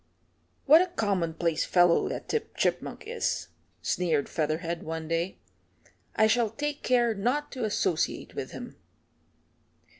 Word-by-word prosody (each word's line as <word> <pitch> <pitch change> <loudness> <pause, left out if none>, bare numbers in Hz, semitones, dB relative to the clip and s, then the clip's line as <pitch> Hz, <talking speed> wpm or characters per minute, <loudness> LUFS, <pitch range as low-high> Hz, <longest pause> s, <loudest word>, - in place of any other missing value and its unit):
"What 310 +4 +8
a 365 - +1
commonplace 170 - 0
fellow 175 -1 +4
that - - -5
Tip 450 -1 -2
Chipmunk - - -1
is," 465 +2 -2 0.3
sneered 160 -6 +1
Featherhead 165 +2 -2
one 160 0 -5
day. 165 +3 -1 0.8
"I 220 - +5
shall 225 +1 +3
take 290 +5 -3
care 240 -2 +3
not 250 +9 -1
to 255 -4 -3
associate 190 -5 -1
with - - -5
him." - - -9
200 Hz, 125 wpm, -28 LUFS, 165-255 Hz, 0.8 s, What